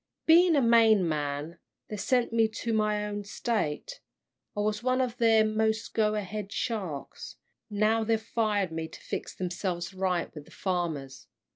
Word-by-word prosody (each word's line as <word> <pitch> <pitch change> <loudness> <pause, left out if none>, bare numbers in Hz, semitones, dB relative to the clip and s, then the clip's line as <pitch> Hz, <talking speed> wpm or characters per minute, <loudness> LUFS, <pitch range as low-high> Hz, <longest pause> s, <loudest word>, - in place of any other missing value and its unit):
Being 335 +1 +6
a 280 - +3
Maine 225 -5 +5
man, 150 +1 -3 0.3
they 215 - -4
sent 240 +3 +1
me 225 -1 +4
to 225 +1 -4
my 210 -1 +1
own 205 0 -4
State. 220 - -3 0.6
I - - +1
was 210 +1 -1
one 255 +1 +1
of 250 -2 -1
their 225 -2 +5
most 220 0 0
go 215 -1 +2
ahead 205 0 -4
sharks, 195 - -4 0.3
now 215 +2 +2
they've 225 0 +1
fired 215 -4 0
me 160 0 -4
to - - -12
fix - - -5
themselves 180 0 -3
right 185 -2 -1
with 150 -2 -9
the - - -18
farmers. 165 -8 -3
210 Hz, 160 wpm, -28 LUFS, 180-225 Hz, 0.6 s, Being